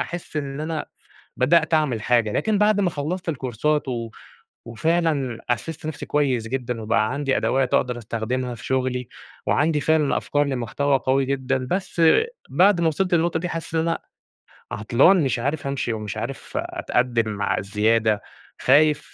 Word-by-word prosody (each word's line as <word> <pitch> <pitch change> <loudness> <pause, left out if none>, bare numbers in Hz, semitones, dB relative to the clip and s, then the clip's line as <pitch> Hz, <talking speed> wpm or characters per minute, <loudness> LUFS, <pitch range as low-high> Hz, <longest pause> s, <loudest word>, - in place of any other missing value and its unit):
أحِس 175 -2 -5
إن 140 -1 -3
أنا 155 0 -3 0.5
بدأت 160 +5 +3
أعمل 145 -8 +2
حاجة، 115 -2 +2
لكن 215 - +1
بعد 210 0 +3
ما 190 -3 +2
خلصت 165 +4 -4
الكورسات 145 +1 -1
و 115 -3 -3 0.6
وفعلًا 140 0 0
أسِست 155 +7 -3
نفسي 155 -2 -5
كويس 130 -6 0
جدًا، 125 -2 -3
وبقى 110 +1 +1
عندي 140 -1 0
أدوات 130 -1 +1
أقدر 125 -1 +1
أستخدمها 120 +2 -3
في 110 - -11
شغلي، 130 -1 -1 0.4
وعندي 150 0 +2
فعلًا 155 0 +2
أفكار 145 0 0
لمحتوى 135 +2 0
قوي 135 +1 +1
جدًا، 130 -1 -1
بس 185 -2 -1 0.5
بعد 185 0 +4
ما 165 - +3
وصلت 180 +4 0
للنقطة 165 -1 +2
دي 180 +2 -3
حسّيت 165 -1 -5
إن - - +3
أنا 165 - +1 0.7
عطلان 130 - +4
مش 130 -2 0
عارف 140 +3 -2
أمشي، 140 -4 -2
ومش 105 -1 -5
عارف 120 +5 -6
أتقدّم 120 -3 0
مع 100 -1 -1
الزيادة، 105 +1 +1 0.4
خايف 150 +3 +3
135 Hz, 155 wpm, -23 LUFS, 120-160 Hz, 0.7 s, بعد